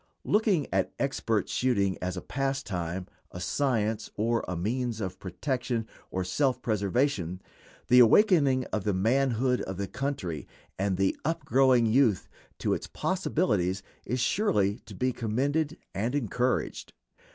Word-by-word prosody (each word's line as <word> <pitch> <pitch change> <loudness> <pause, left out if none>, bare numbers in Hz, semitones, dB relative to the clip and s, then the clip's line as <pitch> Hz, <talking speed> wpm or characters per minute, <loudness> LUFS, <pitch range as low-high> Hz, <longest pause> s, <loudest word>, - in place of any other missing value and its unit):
Looking 205 - +2
at - - 0
expert 115 -7 0
shooting 100 -7 +1
as 90 0 -3
a - - -5
pastime, 95 -11 -2 0.2
a 90 - -8
science, 110 -1 0
or 115 +2 +1
a 90 - -3
means 115 +5 -2
of 95 -4 -4
protection 120 - -2 0.2
or 95 - -2
self 130 +8 +1
preservation, 100 - 0 0.5
the 125 - +7
awakening 135 - +5
of 105 - 0
the 105 -1 0
manhood 125 +4 +2
of 95 - -5
the 100 - -2
country 115 - -4 0.3
and 95 -1 0
the 95 0 +2
up 165 -1 -2
growing 130 -2 +4
youth 115 -4 +3 0.3
to - - 0
its - - -3
possibilities 105 - 0 0.2
is 125 +4 -2
surely 115 - +1
to - - -9
be 130 0 0
commended 145 +8 -1 0.2
and 115 +7 -1
encouraged. 125 -1 -1
120 Hz, 140 wpm, -28 LUFS, 100-135 Hz, 0.5 s, the